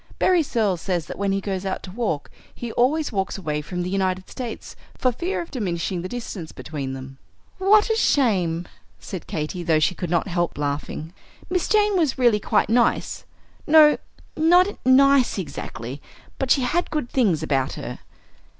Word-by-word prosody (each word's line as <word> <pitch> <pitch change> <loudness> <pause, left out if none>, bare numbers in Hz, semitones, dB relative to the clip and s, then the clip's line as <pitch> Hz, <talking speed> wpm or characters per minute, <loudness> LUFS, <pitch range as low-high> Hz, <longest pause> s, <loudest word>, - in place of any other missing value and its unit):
Berry 365 -2 +4
Searles 215 - 0
says 175 -4 -1
that - - -8
when 200 -1 +1
he 195 - +1
goes 195 -1 -3
out 190 -1 -3
to 185 - -8
walk 205 -8 -2 0.2
he 235 -1 -5
always 290 +7 +1
walks 195 -2 -2
away 150 -5 -2
from 180 +4 -4
the 180 - -3
United 185 -1 -1
States, 240 -3 -6 0.2
for 255 - +2
fear 345 +11 -2
of 335 - -15
diminishing 180 - -2
the 185 - -5
distance 215 -9 -6
between 140 -4 -5
them." 135 0 -9 0.4
"What 420 +4 +5
a - - +2
shame!" 185 - +2 0.3
said 185 -4 -7
Katy, 155 +3 -3
though 165 -2 +2
she 155 +4 +2
could 180 -2 -5
not 170 +2 +1
help 175 -2 -1
laughing. 150 +3 -3 0.4
"Miss 360 -2 +1
Jane 420 -1 +3
was 305 -7 +1
really 240 -5 +4
quite - - +1
nice, 235 +2 +1 0.4
no, 305 -1 +7 0.4
not 355 +5 +4
nice 270 -1 +5
exactly, 135 - -6 0.4
but 265 - -1
she 270 - +4
had 330 +8 0
good 300 -6 -2
things 195 - +2
about 135 -4 0
her." - - -6
195 Hz, 175 wpm, -23 LUFS, 170-270 Hz, 0.4 s, no